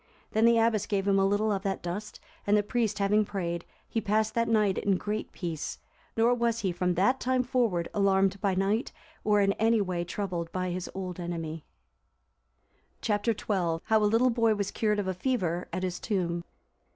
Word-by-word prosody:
Then 220 +1 +3
the 235 0 +5
abbess 225 -2 +2
gave 200 -1 -1
him 195 -1 +4
a 195 - +4
little 210 +2 +1
of 195 -2 0
that 195 -1 -3
dust, 195 +5 -5 0.3
and 205 +1 +5
the 205 - +2
priest 220 -1 0
having 205 +1 +3
prayed, 170 -4 -3 0.2
he 225 - -1
passed 215 +1 +1
that 230 0 +1
night 210 -4 +2
in 195 -2 +1
great 210 +3 -3
peace; 165 -4 -4 0.4
nor 230 +2 +4
was 235 -1 0
he, 190 - 0
from 180 0 0
that 250 +9 +3
time 255 0 +1
forward, 230 -9 0
alarmed 195 -1 +2
by 195 -3 +1
night, 200 +6 0 0.3
or 210 -1 +3
in 195 0 +3
any 225 +1 +4
way 180 -3 -1
troubled 175 -2 -4
by 185 -1 -2
his 180 0 -4
old 185 -2 -5
enemy. 165 -2 -5 1.3
Chap. 205 -1 -1
XII. 225 -3 0 0.4
How 220 -1 +3
a 210 - +4
little 240 +4 +4
boy 230 -2 +3
was 200 -1 -2
cured 210 -1 +1
of 205 -2 -1
a 190 - 0
fever 180 -5 -1
at 185 +2 -3
his 180 -1 -2
tomb. 175 -5 -2
200 Hz, 195 wpm, -28 LUFS, 185-220 Hz, 1.3 s, the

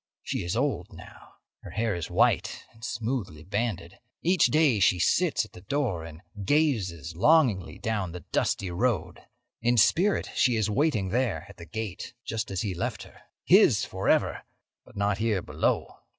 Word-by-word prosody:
She - - -3
is 85 - -2
old - - -1
now. - - -14 0.3
Her - - -10
hair 110 -1 -1
is 85 -2 -4
white - - +1
and 115 0 -19
smoothly 115 - -3
banded. 100 -2 -3 0.2
Each 180 0 +4
day 150 -8 +3
she 95 -1 +4
sits 85 - +2
at - - -19
the 90 - -12
door 105 - -1
and 80 +2 -11 0.2
gazes 95 - 0
longingly 120 - +3
down 110 -7 -2
the 90 +1 -8
dusty 95 -2 0
road. 90 -4 -1 0.4
In 120 +1 +2
spirit 185 - +3
she 125 -1 +3
is 110 -2 0
waiting 110 -6 +1
there 125 +4 -1
at 100 - -14
the 85 - -11
gate, 110 +2 -6
just 115 0 -3
as 95 +2 -2
he 100 -4 -2
left 85 - -3
her—his - - +2
forever, - - 0 0.4
but - - -16
not 100 0 0
here 110 -4 0
below. - - -1
105 Hz, 165 wpm, -27 LUFS, 90-120 Hz, 0.4 s, Each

